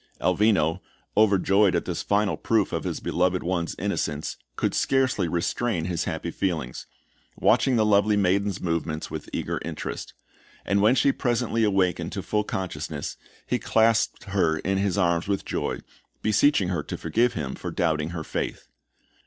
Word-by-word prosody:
Elvino, 95 -5 +2 0.3
overjoyed 100 -2 +4
at - - 0
this 90 -2 -3
final 100 0 +1
proof 110 -4 +1
of - - -2
his - - -2
beloved 90 +1 0
one's 85 -1 -1
innocence, 80 -6 -2 0.2
could - - 0
scarcely 130 -9 +1
restrain 85 +2 -1
his 85 -2 -2
happy 85 0 -3
feelings, 80 -11 -3 0.5
watching 130 -2 +3
the 110 -2 +3
lovely 105 0 +4
maiden's 100 0 +1
movements 85 -2 -2
with - - -6
eager - - -3
interest; - - -5 0.5
and 100 0 +2
when 110 +5 +5
she 140 - +4
presently 120 -3 0
awakened 90 -5 +1
to 100 -2 -4
full 105 0 0
consciousness, 80 -7 -4 0.3
he - - 0
clasped 115 0 +2
her 95 -5 +1
in 95 +3 -1
his 100 -1 0
arms 85 -2 +1
with 100 -1 -1
joy, - - -2 0.4
beseeching 110 -2 +3
her 85 -4 -1
to - - -6
forgive 120 +2 +1
him 70 -5 -3
for - - -6
doubting 80 -2 0
her 85 -2 -5
faith. - - -4
95 Hz, 155 wpm, -25 LUFS, 85-105 Hz, 0.5 s, when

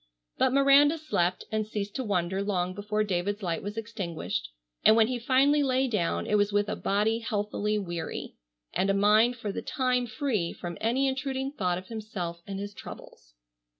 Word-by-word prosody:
But 260 - +4
Miranda 275 +3 +5
slept 185 - -1
and 215 -1 -1
ceased 205 -2 -4
to 260 - -2
wonder 190 -3 0
long 185 -3 -1
before 210 +2 -1
David's 200 +1 -2
light 170 -2 -1
was 205 +2 -6
extinguished, 185 - -4 0.3
and 215 - +7
when 225 -1 +6
he 250 +1 -2
finally 275 +4 +3
lay 265 -1 +2
down 170 - 0
it 210 - +2
was 205 0 +2
with 205 0 +2
a - - -1
body 215 +3 +1
healthily 210 -1 -1
weary, 175 -5 -4 0.4
and 185 +3 +1
a 195 - +3
mind 215 +4 +4
for 215 -4 -4
the - - -4
time 250 -3 0
free 220 -6 -1
from 175 -1 -6
any 255 +5 +2
intruding 265 0 -2
thought 180 -10 -1
of 185 +1 -9
himself 200 -7 -5
and 195 -1 -4
his 205 0 -5
troubles. - - -12
210 Hz, 185 wpm, -28 LUFS, 190-250 Hz, 0.4 s, and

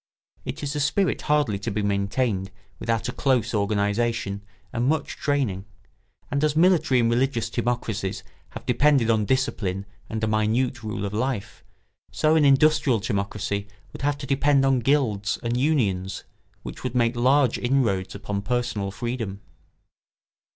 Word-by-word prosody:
It - - -5
is 145 +1 -3
a - - -1
spirit 150 +6 +1
hardly 145 -9 +1
to 105 - -3
be 105 0 -2
maintained 100 0 0 0.3
without 115 -1 -1
a - - -2
close 125 -4 +1
organisation 105 0 0 0.3
and 120 +1 0
much 155 0 0
training; 125 -10 -1 0.7
and 140 +1 0
as 150 -1 +2
military 160 -6 +4
and 115 - +3
religious 115 -1 0
timocracies 115 -5 -2 0.3
have - - -9
depended 140 -6 +3
on 110 -2 +1
discipline 100 -7 -1 0.2
and 110 0 -4
a - - +2
minute 110 +4 +1
rule 105 -2 -4
of 100 - -4
life, 120 -1 -3 0.5
so 155 +1 +2
an 155 -2 +4
industrial 140 -3 +4
timocracy 100 -1 -2 0.3
would - - -8
have 145 +1 0
to 140 - -7
depend 140 0 +3
on 135 -1 +3
guilds 115 -7 +1
and 120 0 -1
unions, 110 -10 0 0.4
which - - -8
would 120 - -3
make 120 0 +2
large 130 +1 +3
inroads 115 -8 0
upon 100 0 -3
personal 115 -3 -1
freedom. 115 -2 -4
120 Hz, 150 wpm, -24 LUFS, 105-135 Hz, 0.7 s, military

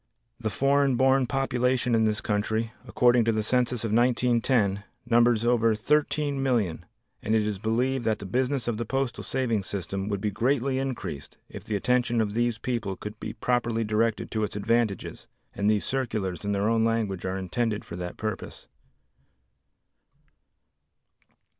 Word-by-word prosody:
The 110 -2 -2
foreign 140 +2 +2
born 130 0 +3
population 125 -2 0
in 110 -1 +3
this 105 0 0
country, 110 +2 -1
according 120 -1 +4
to 115 - +3
the 110 -1 0
census 125 +1 0
of 110 -2 -1
1910, 120 -4 +2 0.2
numbers 120 -1 +3
over 115 -2 +3
13,000,000 135 - +1 0.4
and 110 - 0
it 110 - +3
is 105 -2 -2
believed 120 +4 0
that 110 -1 +1
the 100 - -8
business 130 +6 -1
of 115 -3 -1
the 115 - -3
Postal 135 +1 -2
Savings 115 -7 -1
System 100 +1 -4
would 100 -1 -1
be 105 +1 -1
greatly 130 +4 +1
increased 115 - -5
if - - -9
the 110 - -3
attention 120 +2 +1
of 105 -2 0
these 120 0 0
people 115 -5 -3
could 105 +3 -8
be - - -5
properly 120 -2 0
directed 110 +1 0
to 110 -1 -1
its 105 - -3
advantages, 110 0 -1 0.3
and 100 +1 0
these 105 -1 +1
circulars 110 -9 -2
in 100 - -1
their 100 +1 +1
own 115 0 +2
language 110 -5 0
are 95 +1 -2
intended 105 +4 -2
for - - -7
that 90 0 -6
purpose. 110 -3 -5
115 Hz, 160 wpm, -27 LUFS, 105-125 Hz, 0.4 s, according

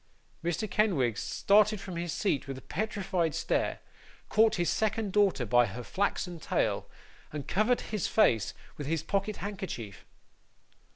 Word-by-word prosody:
Mr. 175 +5 -1
Kenwigs 175 - +1
started 210 +1 +3
from 185 -2 -7
his 170 0 -3
seat 150 -9 0
with 135 -1 -5
a - - -9
petrified 190 -6 -1
stare, - - 0 0.5
caught 220 +1 +4
his 175 -1 0
second 220 -2 0
daughter 195 -11 +3
by 120 +1 +4
her 115 +5 -6
flaxen 180 0 -1
tail, - - -1 0.4
and 150 -2 -5
covered 215 +6 +2
his 210 -5 -2
face 115 - +3 0.2
with 145 - -5
his 160 0 0
pocket 200 +4 -1
handkerchief. 190 - -6
185 Hz, 140 wpm, -30 LUFS, 145-210 Hz, 0.5 s, caught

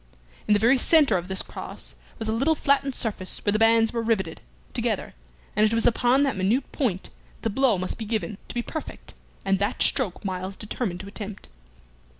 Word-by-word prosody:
In 210 - +5
the - - +3
very 240 +5 +4
centre 290 -6 +5
of 175 -1 -2
this 190 0 +1
cross - - -6 0.2
was 220 - -4
a - - +1
little 270 +8 +2
flattened 280 -2 +1
surface 200 -5 -2
where 205 - +3
the 215 - +1
bands 225 0 +4
were 230 - 0
riveted 215 -8 -1 0.3
together, - - -1 0.4
and 210 - +3
it 215 +1 +3
was 230 - +3
upon 245 +3 +4
that 275 - +1
minute 205 +8 0
point 210 -10 -1
that - - -14 0.3
the 225 - +1
blow 250 -2 +3
must 185 +4 -3
be 220 - -4
given 215 -1 -3
to - - -8
be 240 - -1
perfect, 315 +4 -7 0.3
and 195 -1 +2
that 205 - +1
stroke 210 -8 +1
Myles 190 0 -3
determined 210 -4 -4
to 195 - -10
attempt. 200 - -8
220 Hz, 200 wpm, -25 LUFS, 195-245 Hz, 0.4 s, In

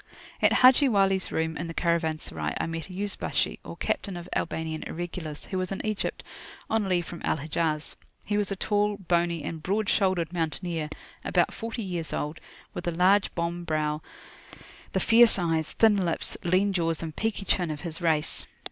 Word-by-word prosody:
[p.132]At - - +5
Haji 260 +2 +6
Wali's 195 -3 +2
room 160 0 -1
in 170 - -4
the 165 - -7
Caravanserai, 160 - -1
I - - 0
met 165 +2 -5
a - - -9
Yuzbashi, 200 +2 0
or - - -8
captain 195 -4 -2
of 175 0 -8
Albanian 160 -1 -2
Irregulars, 165 -3 -5
who 190 - -3
was 185 +1 -2
in 195 - -3
Egypt 215 -2 -2 0.5
on 215 -3 +1
leave 175 -2 +1
from 170 - -8
Al - - +1
Hijaz. 155 +1 -2 0.3
He 205 - -1
was 205 -1 +1
a - - 0
tall, 205 +1 +1
bony, 170 -3 0
and 160 +1 -5
broad 205 +5 0
shouldered 185 -4 +1
mountaineer, 165 -1 -1 0.3
about - - +2
forty 230 0 -4
years 175 -4 -4
old, 150 +2 -3 0.3
with - - -5
the 175 - +1
large 190 +3 +4
bombe 170 +1 -2
brow, 155 -1 0 0.9
the - - +1
fierce 235 -1 +6
eyes, 165 -3 0
thin 220 -2 +5
lips, 170 -2 -1
lean 185 +3 +2
jaws, 165 -3 0
and 160 -2 -5
peaky 220 -2 -2
chin 180 -4 +2
of 150 -1 -4
his 165 +1 -4
race. 160 -3 +2
175 Hz, 180 wpm, -27 LUFS, 160-195 Hz, 0.9 s, Haji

